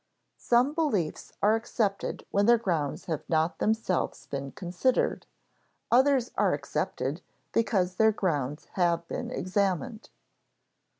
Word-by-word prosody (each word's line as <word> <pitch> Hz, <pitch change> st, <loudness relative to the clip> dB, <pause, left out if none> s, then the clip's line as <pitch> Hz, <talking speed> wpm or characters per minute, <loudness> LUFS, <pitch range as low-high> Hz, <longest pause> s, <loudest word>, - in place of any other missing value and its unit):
Some 245 Hz, +4 st, +3 dB
beliefs 230 Hz, -, -1 dB
are 210 Hz, +2 st, +5 dB
accepted 220 Hz, -3 st, -2 dB
when 200 Hz, +1 st, +2 dB
their 240 Hz, 0 st, +7 dB
grounds 170 Hz, -10 st, -2 dB
have 160 Hz, -3 st, -2 dB
not 160 Hz, +1 st, +1 dB
themselves 220 Hz, -4 st, 0 dB
been 140 Hz, -1 st, -5 dB
considered, 185 Hz, -, 0 dB, 0.6 s
others 260 Hz, 0 st, +4 dB
are -, -, +3 dB
accepted -, -, -3 dB, 0.3 s
because 185 Hz, -5 st, +1 dB
their 220 Hz, 0 st, +5 dB
grounds 150 Hz, -8 st, -2 dB
have 170 Hz, -2 st, +1 dB
been -, -, -4 dB
examined. 200 Hz, +4 st, -1 dB
195 Hz, 115 wpm, -28 LUFS, 170-230 Hz, 0.6 s, their